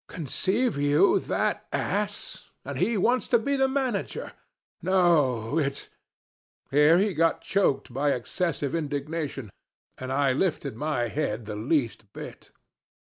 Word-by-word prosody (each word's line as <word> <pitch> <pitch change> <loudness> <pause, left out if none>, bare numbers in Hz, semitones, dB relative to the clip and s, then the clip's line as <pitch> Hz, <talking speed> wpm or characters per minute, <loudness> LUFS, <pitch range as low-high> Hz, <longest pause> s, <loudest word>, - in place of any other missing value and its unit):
Conceive 190 - 0
you 145 +6 +4
that - - -1
ass! - - -2 0.2
And - - -5
he 230 -1 +1
wants 245 +6 +2
to 240 - +4
be 280 +5 -1
manager! 265 -6 -2 0.5
No, 155 -9 +2
it's 140 -2 -2 0.4
' - - -48
Here 150 +4 +6
he 200 +1 +2
got 165 +1 +2
choked 140 -10 0
by 140 +2 +1
excessive 145 +3 -2
indignation, 145 -5 -3 0.5
and 130 0 -5
I 135 -1 +2
lifted 145 - -1
my 125 -3 -1
head 115 -6 -2
the 105 -1 -5
least 115 -3 -1
bit. - - -9
150 Hz, 130 wpm, -26 LUFS, 135-185 Hz, 0.5 s, Here